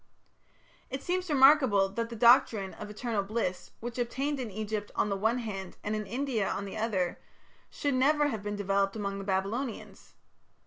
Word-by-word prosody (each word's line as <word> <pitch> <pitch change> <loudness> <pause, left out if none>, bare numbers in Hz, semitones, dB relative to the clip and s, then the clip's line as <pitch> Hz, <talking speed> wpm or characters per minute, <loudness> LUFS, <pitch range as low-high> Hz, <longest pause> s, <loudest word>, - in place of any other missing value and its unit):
It 265 +1 -5
seems 360 0 -1
remarkable 265 -8 +6
that 230 +4 -3
the 235 - -7
doctrine 225 -4 +4
of 210 - -8
Eternal 215 0 -2
Bliss, 195 -3 -3
which 240 +1 -5
obtained 270 +4 -1
in 245 -4 -3
Egypt 210 0 -4
on 210 - +1
the 200 - 0
one 220 +5 +1
hand 195 -6 -5
and 210 +1 -1
in 215 -1 -4
India 240 -2 -1
on 200 - -3
the 195 - -7
other, 205 -5 -1 0.5
should 285 -1 -1
never 290 +3 +3
have 220 -6 -3
been 205 0 -3
developed 195 0 0
among 200 -2 -3
the - - -5
Babylonians. 205 +6 -3
220 Hz, 175 wpm, -30 LUFS, 200-255 Hz, 0.5 s, remarkable